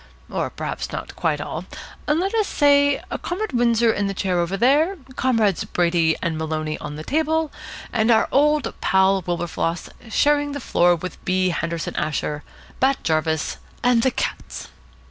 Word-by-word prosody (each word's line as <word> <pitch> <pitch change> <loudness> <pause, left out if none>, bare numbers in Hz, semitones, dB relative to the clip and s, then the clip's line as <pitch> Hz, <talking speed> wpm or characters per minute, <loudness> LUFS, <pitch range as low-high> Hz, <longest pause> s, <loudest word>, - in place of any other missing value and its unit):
Or - - -1
perhaps - - -5
not - - -6
quite 150 -2 0
all. 155 +4 -5 0.4
Let 345 +7 +1
us 435 -3 +2
say, 285 -1 +3 0.2
Comrade 380 0 -3
Windsor 235 -2 +3
in 200 0 -1
the 195 - -3
chair 185 -2 0
over 175 +3 -1
there, 295 - +3 0.2
Comrades 225 -9 +1
Brady 170 -2 +1
and 165 -3 -1
Maloney 155 -1 -2
on 150 0 -6
the 155 - -7
table, 315 - 0 0.4
and 220 0 +2
our 225 -2 +4
old 300 +1 +2
pal 190 0 +3
Wilberfloss 170 -1 -2 0.2
sharing 290 +4 +2
the 285 - -4
floor 175 -8 +3
with 180 +2 -8
B. 185 0 +1
Henderson 170 0 -3
Asher, 150 0 -2 0.4
Bat 270 +1 +2
Jarvis, 160 -1 0 0.3
and 245 -1 +4
the 260 - +3
cats. 255 - -4
195 Hz, 155 wpm, -22 LUFS, -, 0.4 s, our